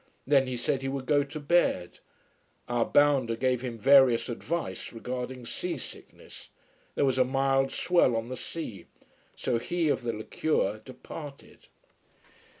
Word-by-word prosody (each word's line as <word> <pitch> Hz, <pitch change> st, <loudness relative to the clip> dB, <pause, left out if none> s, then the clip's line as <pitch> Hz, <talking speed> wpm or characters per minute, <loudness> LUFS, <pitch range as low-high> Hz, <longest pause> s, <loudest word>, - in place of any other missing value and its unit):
Then 135 Hz, -1 st, +4 dB
he 125 Hz, -1 st, -3 dB
said 130 Hz, +2 st, -1 dB
he 135 Hz, -, -3 dB
would 135 Hz, -1 st, -4 dB
go 145 Hz, +1 st, +3 dB
to 145 Hz, +2 st, -7 dB
bed. 145 Hz, -, +1 dB, 0.7 s
Our 120 Hz, -1 st, +1 dB
bounder 140 Hz, -5 st, +3 dB
gave 125 Hz, +1 st, 0 dB
him 125 Hz, -3 st, -5 dB
various 130 Hz, -1 st, +5 dB
advice 165 Hz, +8 st, -4 dB
regarding 125 Hz, +1 st, -5 dB
seasickness. -, -, -7 dB, 0.5 s
There -, -, +2 dB
was 130 Hz, -1 st, +1 dB
a -, -, +7 dB
mild 135 Hz, +1 st, +1 dB
swell 170 Hz, -9 st, +2 dB
on 115 Hz, 0 st, -2 dB
the 130 Hz, -, -5 dB
sea. 125 Hz, -5 st, -7 dB, 0.5 s
So 115 Hz, -, -1 dB
he 170 Hz, +5 st, -1 dB
of 140 Hz, -, +1 dB
the 120 Hz, -1 st, -2 dB
liqueur 110 Hz, -1 st, -1 dB
departed. 140 Hz, +3 st, -11 dB
130 Hz, 145 wpm, -28 LUFS, 120-140 Hz, 0.7 s, a